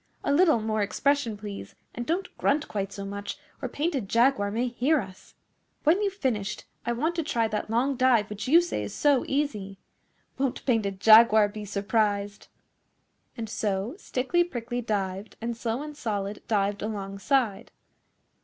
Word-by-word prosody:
A 280 - +1
little 315 -5 +5
more 215 0 -1
expression, 240 +2 +1
please, 205 -1 -8 0.2
and 240 0 -5
don't 355 +4 -2
grunt 290 +2 +1
quite 200 -1 -3
so 200 0 -6
much, 200 +3 -5 0.2
or 260 - -3
Painted 285 - -2
Jaguar 235 -3 +3
may 235 +5 -1
hear 270 +6 +2
us. 190 -4 -10 0.5
When 330 +7 +4
you've 400 -2 -1
finished, 210 - -2 0.2
I - - +2
want 300 +9 0
to 330 - +1
try 235 -7 0
that 210 0 -3
long 250 +4 +1
dive 240 -5 +4
which 210 +3 -6
you 330 +6 +7
say 350 - -3
is - - -6
so 285 -3 +3
easy. 215 -9 -2 0.6
Won't 270 -1 -1
Painted 210 -6 0
Jaguar 220 -1 +7
be 210 0 -7
surprised!' 205 0 -1 0.9
And 225 -1 -4
so 205 +2 -2
Stickly 345 +3 +1
Prickly 245 -6 -4
dived, 200 -2 -3
and 235 +1 -3
Slow 230 +3 -3
and 300 0 -8
Solid 205 -6 -3
dived 205 -1 0
alongside. 205 +2 -1
225 Hz, 160 wpm, -27 LUFS, 205-275 Hz, 0.9 s, you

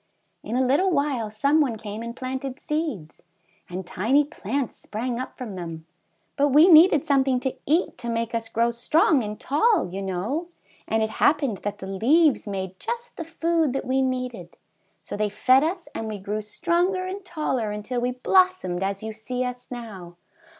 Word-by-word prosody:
In 230 - -4
a 260 +1 +2
little 295 +10 +3
while 280 - 0
some 280 +9 +2
one 260 -6 +1
came 215 0 -7
and 235 0 -6
planted 260 +1 -5
seeds, 300 - -4 0.5
and 180 +1 -5
tiny 240 +12 +2
plants 275 -3 -3
sprang 235 +3 -4
up 255 - -6
from 240 -6 -6
them; 165 -3 -7 0.5
but 285 0 +4
we 295 +5 +6
needed 320 -3 +7
something 270 -2 +2
to 265 -1 -1
eat 315 -2 +1
to 235 -1 -5
make 230 0 -2
us 225 -1 -2
grow 235 +1 +1
strong 275 +4 +3
and 210 0 -5
tall, 410 - +2
you 195 - -3
know, 200 - -2 0.4
and 220 0 +1
it 220 - -2
happened 280 -4 +2
that 205 0 -4
the 190 - -8
leaves 255 - +3
made 190 -2 -4
just 475 +2 -5
the 330 - -5
food 330 -3 0
that 270 - -2
we 265 +1 +1
needed, 255 -2 -3 0.5
so - - -6
they 210 0 0
fed 255 +6 +4
us 345 +2 -2
and 225 - -4
we 215 -1 -4
grew 205 +2 -3
stronger 350 - 0
and 385 +2 -5
taller 300 -10 -2
until 210 +4 -3
we 245 - +1
blossomed 255 - +2
as 195 +1 -2
you 220 0 -4
see 250 +4 -3
us 250 0 -6
now." 205 -8 -8
250 Hz, 185 wpm, -25 LUFS, 215-300 Hz, 0.5 s, needed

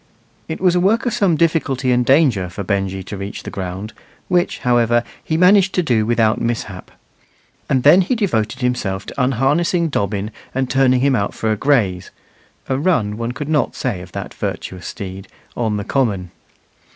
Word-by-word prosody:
It 160 - -5
was 180 -1 +3
a 180 - +2
work 210 +7 +2
of 240 - 0
some 185 -5 +2
difficulty 145 -6 +1
and 125 0 +3
danger 130 - +3
for 100 +3 -6
Benjy 95 -1 -2
to 100 - -7
reach 100 +1 -6
the - - -7
ground, 95 +3 -5 0.4
which, 180 0 +1
however, 120 -1 +3 0.2
he 160 - -1
managed 190 +2 +5
to 180 - +2
do 115 -7 +1
without 115 -2 +2
mishap; 110 -5 -3 0.8
and 130 -3 +2
then 160 +6 +7
he 190 +8 0
devoted 150 - -1
himself 100 -6 -1
to - - -4
unharnessing 150 +7 +1
Dobbin 100 -4 -2 0.2
and 130 -1 -1
turning 130 -1 +3
him 135 0 +3
out 100 -4 -1
for 110 - -1
a - - +2
graze 105 -8 +1 0.6
("a 130 0 0
run" 130 - +1
one 115 +2 -3
could 145 +2 -5
not 150 -2 0
say 110 -9 -3
of 90 - -11
that - - -6
virtuous 90 -1 -5
steed) 95 0 -7 0.3
on 110 -3 -1
the 105 - -3
common. 100 -10 -1
125 Hz, 180 wpm, -19 LUFS, 105-155 Hz, 0.8 s, then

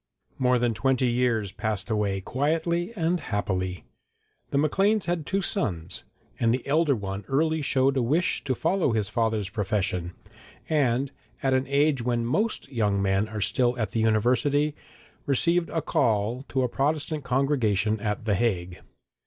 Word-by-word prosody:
More 125 -1 +3
than 120 -1 +1
twenty 130 +3 +1
years 120 -4 +1
passed 105 +1 -3
away 100 -3 0
quietly 165 - -1
and 175 -1 0
happily. 95 - -2 0.6
The - - -1
Macleans 195 +8 +2
had 170 -4 -2
two 195 0 0
sons, 90 - -2 0.3
and 115 -1 +3
the 125 +1 -1
elder 150 0 +2
one 100 -2 -5
early 155 +3 +1
showed 135 -1 +2
a 130 - +2
wish 155 +9 +1
to 130 - 0
follow 165 -2 +1
his 105 -3 0
father's 110 -2 0
profession, 95 -4 -1 0.5
and, 135 -3 +1 0.3
at 135 -1 +2
an 130 0 +1
age 140 -1 +2
when 120 -1 0
most 210 - 0
young 105 -5 +1
men 95 +1 +1
are 110 -1 -4
still 125 +3 +1
at 110 -3 -2
the 115 - -1
University, 125 +7 +2 0.5
received 170 +5 +2
a 165 - -2
'call' 115 +4 0
to 130 -1 0
a - - +2
Protestant 150 +3 -1
congregation 125 -6 +1
at 105 0 -3
the 105 - +2
Hague. 90 -4 -1
125 Hz, 155 wpm, -26 LUFS, 105-145 Hz, 0.6 s, More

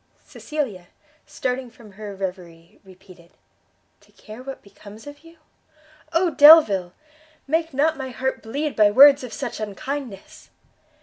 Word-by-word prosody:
Cecilia, 245 - -6 0.4
starting 255 -3 -4
from 230 -3 -17
her 205 0 -10
reverie, 180 -3 -9
repeated, 185 -2 -18 0.7
"To - - -27
care 215 +3 -13
what 270 +1 -10
becomes 205 +1 -15
of 290 0 -12
you? 330 +2 -19 0.7
Oh 335 +1 +1
Delvile! 280 - +6 0.5
make 325 +3 -1
not 300 +3 0
my 265 -1 -6
heart 265 +1 -4
bleed 285 +7 -4
by 210 -1 +4
words 275 +5 +6
of 250 - -8
such 260 -5 -6
unkindness!" 215 +1 -8
250 Hz, 130 wpm, -21 LUFS, 200-290 Hz, 0.7 s, Delvile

